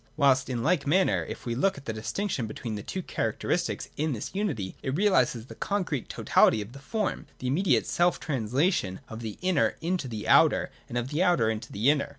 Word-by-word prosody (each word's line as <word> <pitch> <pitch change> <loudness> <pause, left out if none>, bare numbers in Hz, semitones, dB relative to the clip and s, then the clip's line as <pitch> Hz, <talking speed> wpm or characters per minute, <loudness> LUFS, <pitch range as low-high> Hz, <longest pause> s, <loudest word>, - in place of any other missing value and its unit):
Whilst 140 -2 +3
in 120 -2 -2
like 155 -3 +1
manner, 185 +6 +3
if - - -8
we 120 - -1
look 190 +11 +1
at 140 - -11
the 115 - -3
distinction 120 - -2
between 110 +1 -5
the 105 - -4
two 185 - -5
characteristics 170 +11 -1
in 155 0 0
this 110 - -5
unity, 155 - -2
it 135 0 -2
realises 130 - +2
the - - -10
concrete 180 - -2
totality 110 - +3
of 105 +3 -7
the 135 - -10
form, 210 +8 -2
the - - -8
immediate 135 - +2
selftranslation 140 - +1
of 110 +1 -7 0.2
inner 185 -1 +2
into 170 -5 -2 0.2
outer, - - +5 0.2
and 120 - -3
of 125 +5 -3
outer 165 -10 +3
into 110 -1 -6
inner. 140 +7 +2
140 Hz, 180 wpm, -28 LUFS, 115-180 Hz, 0.2 s, outer